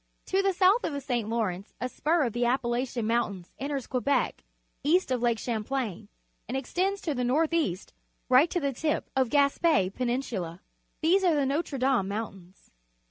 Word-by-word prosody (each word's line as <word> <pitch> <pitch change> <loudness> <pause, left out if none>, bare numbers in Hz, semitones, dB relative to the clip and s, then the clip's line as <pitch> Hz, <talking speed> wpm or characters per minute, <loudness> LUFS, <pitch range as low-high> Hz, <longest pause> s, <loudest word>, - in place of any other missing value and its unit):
To 385 +1 +1
the 390 0 +2
south 385 +6 +4
of - - -2
the 285 - -2
St. 245 -5 -2
Lawrence 210 -4 -2
a 250 - -1
spur 310 +5 +1
of 235 -5 -1
the 240 - 0
Appalachian 240 -1 0
Mountait^s 215 -6 -1
enters 275 -1 -3
Quebec 265 +2 0 0.4
east 325 +1 +2
of 250 -2 0
Lake 235 -2 +2
Champlain 220 -3 -3 0.4
and 260 - -2
extends 375 +9 -1
to 310 - -1
the 250 -2 -2
north 305 +7 +2
east 200 - -1 0.3
right 260 +6 +5
to 350 - 0
the 280 -4 -1
tip 305 +4 -2
of 260 -2 +2
Gaspe 280 - +3
Penin 250 +2 -1
sula. 175 -8 -5 0.4
These 360 +5 +3
are 345 -4 +4
the 285 -2 +2
Noire 280 +1 -1
Dame 255 -6 +2
Mountains. 195 -3 -7
255 Hz, 180 wpm, -28 LUFS, 230-300 Hz, 0.4 s, right